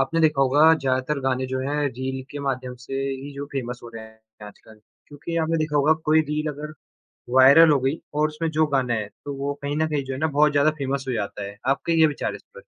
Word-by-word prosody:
आपने 135 +5 0
देखा 150 -3 +3
होगा 145 +5 +5
ज़्यादातर 135 0 -1
गाने 130 0 -1
जो 130 0 -3
हैं 145 - -1
रील 130 +1 -5
के 145 - -6
माध्यम 130 -1 -3
से 135 - -6 0.2
ही 135 +2 -6
जो 140 0 -6
फ़ेमस 125 -3 -4
हो 120 - -9
रहे 110 -1 -7
हैं 110 -1 -16
आजकल 110 +1 -16 0.3
क्योंकि 150 +3 -7
आपने 165 0 +1
देखा 155 -1 -1
होगा 145 +2 +4 0.2
कोई 155 0 +6
रील 150 +1 -2
अगर 150 +2 -8 0.6
वायरल 140 +5 +8
हो 145 - +4
गई 135 +5 -1 0.2
और 150 +1 +2
उसमें 160 +2 -3
जो 155 0 +2
गाना 130 -4 0
है, 105 -2 -3 0.2
तो 140 -1 -5
वो 140 +1 -3
कहीं 145 +1 -2
न 160 - +1
कहीं 145 -3 -2
जो 135 - -5
है 130 - -6
ना 160 - +2
बहुत 150 0 +5
ज़्यादा 145 +1 +3
फ़ेमस 135 0 -2
हो 130 - 0
जाता 105 -2 -4
है। 100 +1 -8
आपके 165 +4 +1
क्या 160 -1 +5
विचार 145 - -3
हैं - - -6
इस - - -17
पर? - - -12
140 Hz, 250 wpm, -23 LUFS, 130-150 Hz, 0.6 s, वायरल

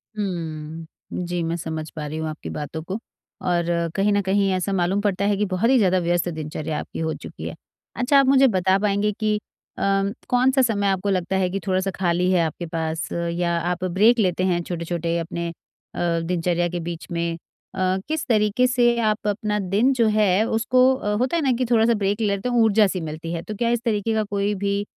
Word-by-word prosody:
हुँ। 165 -5 -4 0.4
जी, 175 0 -2
मैं 165 +1 -1
समझ 160 -2 -5
पा 155 -2 -4
रही 150 +1 -5
हूँ 160 0 -2
आपकी 155 - -7
बातों 155 +2 -5
को 190 +5 -4 0.5
और 175 -1 +1 0.3
कहीं 200 +1 +2
न 205 - +2
कहीं 195 +1 +1
ऐसा 185 +2 -1
मालूम 190 +2 +1
पड़ता 200 -1 0
है 205 -1 +2
कि 210 - +1
बहुत 190 +4 0
ही 265 - +5
ज़्यादा 185 -4 +3
व्यस्त 175 0 0
दिनचर्या 155 -1 -4
आपकी - - -7
हो 160 -1 -1
चुकी - - -8
है। - - -6 0.4
अच्छा, 275 +3 +4
आप 275 - +4
मुझे 270 0 +6
बता 190 -3 +2
पाएँगे 205 +1 +1
कि 215 -1 +1 0.4
अम, 195 0 +1 0.2
कौन-सा 260 +2 +3
समय 205 -5 +1
आपको 195 +1 0
लगता 185 0 0
है 185 -1 +1
कि 195 +2 -2
थोड़ा-सा 190 +1 +1
खाली 180 0 +1
है 180 - +3
आपके 165 +2 -4
पास 160 0 -3
या 170 0 -1 0.2
आप 180 +1 -3
ब्रेक 205 +7 +4
लेते 185 -3 +1
हैं 175 -2 +1
छोटे-छोटे 170 -1 -2
अपने 170 +1 -4
अ, 170 0 -4
दिनचर्या 175 0 0
के 175 0 -3
बीच 170 0 -6
में? 170 0 -1 0.4
अ, 185 0 +1
किस 315 0 -2
तरीके 220 +2 +3
से 240 -1 +3
आप 215 -1 0
अपना 210 0 -1
दिन 205 +7 +2
जो 235 -3 +2
है 205 0 +4
उसको 255 +3 +3
अ, 210 -5 -2
होता 255 +8 0
है - - +1
ना 265 - +3
कि 255 - 0
थोड़ा-सा 230 0 +4
ब्रेक 205 +1 -1
लेते 200 +3 0
हों 240 -2 +3
ऊर्जा-सी 205 -4 +3
मिलती 160 +1 -5
है, 165 - -3
तो 215 - -6
क्या 235 +3 0
इस 235 -1 +1
तरीके 220 -1 0
का 220 0 +1
कोई 200 0 -1
भी 200 +1 -1
195 Hz, 210 wpm, -23 LUFS, 170-215 Hz, 0.5 s, मुझे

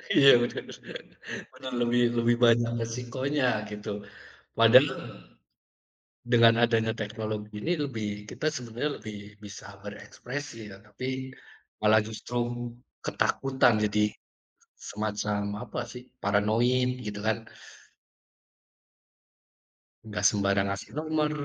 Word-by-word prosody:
Iya, 140 - +8
bener 120 - -2 0.9
bener 130 -1 -8
lebih 120 +1 +3
lebih 120 0 +3
banyak 115 0 +4
resikonya 125 +4 -1 0.2
gitu, 105 -1 -6 0.5
padahal - - +8 1.4
dengan 115 -1 +7
adanya 115 -1 +3
teknologi 105 0 -4
ini 170 - +1
lebih 125 -8 -2 0.2
kita 155 - -1
sebenarnya 125 0 -3
lebih 105 -1 -7 0.3
bisa 100 -1 -9 0.2
berekspresi, 115 +1 -7
tetapi 105 +5 -7 0.7
malah 110 +1 +6
justru 110 +3 -5 0.6
ketakutan 130 -4 +2
jadi 105 0 +2 0.7
semacam 105 -1 -3
apa - - -5
sih, 125 0 -9 0.2
paranoid, 120 +5 +2
gitu 105 -3 -5
kan. 110 0 -1 2.6
Nggak 105 - -4
sembarang 100 -1 +1
ngasih 100 0 -4
nomor, 155 -1 0
110 Hz, 95 wpm, -28 LUFS, 105-125 Hz, 2.6 s, Iya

